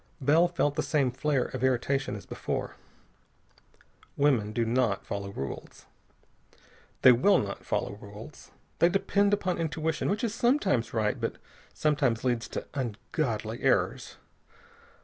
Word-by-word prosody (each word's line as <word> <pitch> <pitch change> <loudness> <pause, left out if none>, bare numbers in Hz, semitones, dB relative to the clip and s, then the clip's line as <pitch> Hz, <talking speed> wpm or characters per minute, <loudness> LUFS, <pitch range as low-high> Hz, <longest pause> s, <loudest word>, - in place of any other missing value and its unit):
Bell 155 +5 +4
felt 160 -4 0
the - - -1
same 140 -5 +1
flare 135 0 0
of - - -5
irritation 130 -1 +1
as 105 - -9
before. - - -4 1.4
Women 130 -8 +2
do 115 +1 0
not 115 -3 +1
follow 100 0 -4
rules. 70 -8 -7 1.2
They 130 - +10
will 135 +12 +5
not 100 -1 -3
follow - - -2
rules. 105 +6 -12 0.3
They 170 - +5
depend 200 +2 +2
upon 185 -4 0
intuition, 160 -1 -1
which 210 +5 -1
is 225 -3 0
sometimes 235 - +1
right, 110 -2 0
but - - -2 0.4
sometimes 140 -6 +1
leads 120 -2 0
to - - -5
ungodly 115 -2 -3
errors. - - +1
135 Hz, 130 wpm, -28 LUFS, 115-165 Hz, 1.4 s, They